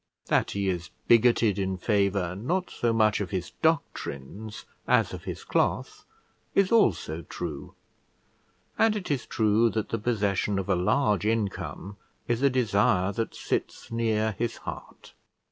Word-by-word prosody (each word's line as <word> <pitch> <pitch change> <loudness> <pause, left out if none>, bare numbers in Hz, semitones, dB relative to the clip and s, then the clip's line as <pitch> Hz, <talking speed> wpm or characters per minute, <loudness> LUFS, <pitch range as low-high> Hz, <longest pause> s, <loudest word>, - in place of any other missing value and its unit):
That - - +2
he 100 -1 -2
is 90 -3 -2 0.2
bigoted 115 -3 +4
in 95 -1 -1
favour, 100 -3 +1
not 175 - -2
so 120 - 0
much 110 -2 +3
of 100 - -3
his 90 -3 -3
doctrines 110 - -2 0.2
as - - +3
of - - -8
his - - -5
cloth, - - -1 0.5
is 195 -1 +3
also 85 - +2
true: 75 - -7 1.0
and 225 -1 +4
it 195 -7 -3
is 135 -4 -1
true 110 +1 +3
that 110 -1 -2
the 115 - -2
possession 105 -3 0
of 95 - -3
a - - +4
large 105 +1 +2
income 100 -2 -2 0.3
is 120 0 0
a 140 - +5
desire 105 -5 +2
that 115 +3 -3
sits - - -3
near 110 -1 +1
his 120 0 -1
heart. - - -9
110 Hz, 145 wpm, -27 LUFS, 95-120 Hz, 1.0 s, a